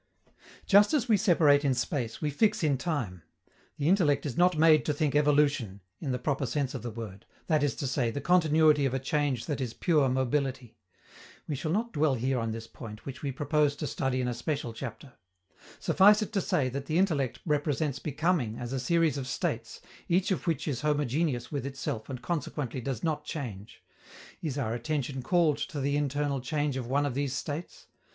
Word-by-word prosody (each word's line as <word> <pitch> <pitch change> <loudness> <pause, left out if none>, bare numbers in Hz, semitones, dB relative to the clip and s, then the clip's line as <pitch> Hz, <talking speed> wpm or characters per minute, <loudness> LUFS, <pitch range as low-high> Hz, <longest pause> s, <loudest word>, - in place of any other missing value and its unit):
Just 205 +7 +5
as 260 -4 +1
we 225 - +5
separate 160 -8 +4
in 135 -2 +2
space, 120 -1 -3
we 150 - 0
fix 210 +5 +2
in 145 -3 +3
time. 125 - -3 0.6
The 145 - -1
intellect 155 -7 +3
is 140 - -3
not 180 -1 +3
made 155 -1 +6
to 150 - 0
think 145 -1 0
evolution, 145 -8 +2 0.2
in 140 - -3
the 125 - 0
proper 135 +1 -1
sense 135 +3 -1
of 135 - -5
the 120 - -4
word 110 -3 -8 0.2
that 155 -3 +2
is 145 -4 +1
to - - -4
say, 130 -2 0
the 130 - -3
continuity 155 -3 +4
of 130 - -2
a - - 0
change 135 -2 -1
that 145 -4 -3
is 120 -3 -4
pure 150 -6 +2
mobility. 130 -1 -1 0.7
We 150 - -2
shall 155 +3 -3
not 225 +6 -1
dwell 150 -3 +2
here 130 +2 0
on 115 0 -2
this 115 0 -6
point, 110 -1 -10
which 135 -1 -7
we 140 - -2
propose 145 +1 +1
to 150 - -4
study 135 -4 -1
in 125 - -1
a 125 - -1
special 120 0 -3
chapter. 125 +2 -8 0.7
Suffice 210 +3 +5
it 210 - -8
to 195 - +1
say 140 -6 +1
that 140 +2 -5
the 155 - 0
intellect 155 - +1
represents 150 -2 0
becoming 150 -6 0
as 120 +1 -5
a 135 - -1
series 165 +1 +2
of 130 - -5
states, 115 -2 -3 0.3
each 180 +4 +2
of 185 - -2
which 165 -3 -1
is 130 -5 -2
homogeneous 145 -3 0
with 145 -3 -2
itself 135 -4 -4
and 125 -2 -6
consequently 145 -6 -3
does 120 -2 -4
not 155 -2 -1
change. 115 -10 -7 0.6
Is 145 -4 -3
our 115 -5 -1
attention 130 +2 -2
called 160 +1 +2
to 150 - -4
the 140 +1 0
internal 145 -1 -1
change 145 +2 -1
of 130 -3 -4
one 140 +3 +1
of 140 - -1
these 140 0 -1
states? 145 +5 -5
140 Hz, 200 wpm, -29 LUFS, 125-155 Hz, 0.7 s, made